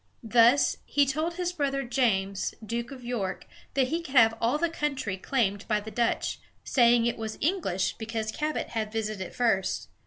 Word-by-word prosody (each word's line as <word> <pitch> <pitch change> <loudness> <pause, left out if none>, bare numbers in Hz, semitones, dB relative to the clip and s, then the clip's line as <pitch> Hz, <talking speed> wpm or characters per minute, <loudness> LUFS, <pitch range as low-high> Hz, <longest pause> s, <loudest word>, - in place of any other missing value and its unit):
Thus, 235 +4 +4
he 285 -1 +2
told 310 +5 -1
his 360 0 -2
brother 275 -4 -1
James, 200 -7 0
Duke 235 +2 -3
of 265 -3 -10
York, 225 -6 -3 0.3
that 265 -2 +2
he 330 +2 -1
could 280 -4 -9
have 225 -3 +6
all 240 +6 +2
the 340 +2 +1
country 275 - -2
claimed 205 -1 -1
by 210 -2 +2
the 215 +1 -8
Dutch, 235 0 0 0.2
saying 240 -2 +4
that 235 - +3
it - - -4
was 220 -1 -5
English 300 - 0
because 220 -1 -3
Cabot 305 +5 -2
had 215 -2 -3
visited 215 -2 -3
it 190 - -7
first. 225 -6 0
235 Hz, 185 wpm, -28 LUFS, 215-275 Hz, 0.3 s, have